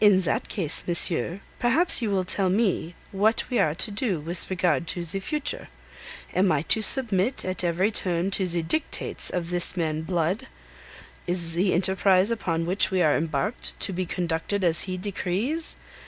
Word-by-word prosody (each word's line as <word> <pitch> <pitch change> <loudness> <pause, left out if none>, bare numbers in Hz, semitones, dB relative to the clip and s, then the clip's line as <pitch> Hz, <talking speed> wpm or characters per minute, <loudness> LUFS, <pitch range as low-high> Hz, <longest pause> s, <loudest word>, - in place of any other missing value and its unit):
"In 205 -3 +5
that 175 - -1
case, 165 -7 +2
monsieur, 175 +1 +2 0.2
perhaps 265 +6 +1
you 225 - -1
will 195 -2 0
tell 190 +1 +1
me 190 -4 -1 0.2
what 210 +3 +1
we 245 - +1
are 150 - +1
to 210 - +2
do 200 -4 -2
with 170 +4 -6
regard 175 -3 0
to 175 - -2
the 175 +4 -3
future. 300 +8 -1 0.7
Am 185 0 +2
I 145 -1 0
to 220 - +1
submit 225 -1 +3
at 185 0 -2
every 180 +5 0
turn 180 -2 +1
to 190 -1 +1
the 170 -1 0
dictates 310 - 0
of 175 -1 -4
this 175 +1 +4
man 155 -2 -2
Blood? 180 +8 -2 0.8
Is 175 -2 +2
the 180 +2 +1
enterprise 190 +2 +2
upon 165 -7 -2
which 185 +4 +1
we 185 -2 0
are 150 - +3
embarked 155 - -3
to 195 - +3
be 180 0 -3
conducted 175 +4 -3
as 170 -2 +4
he 185 - -3
decrees? 205 - -3
185 Hz, 175 wpm, -24 LUFS, 170-205 Hz, 0.8 s, In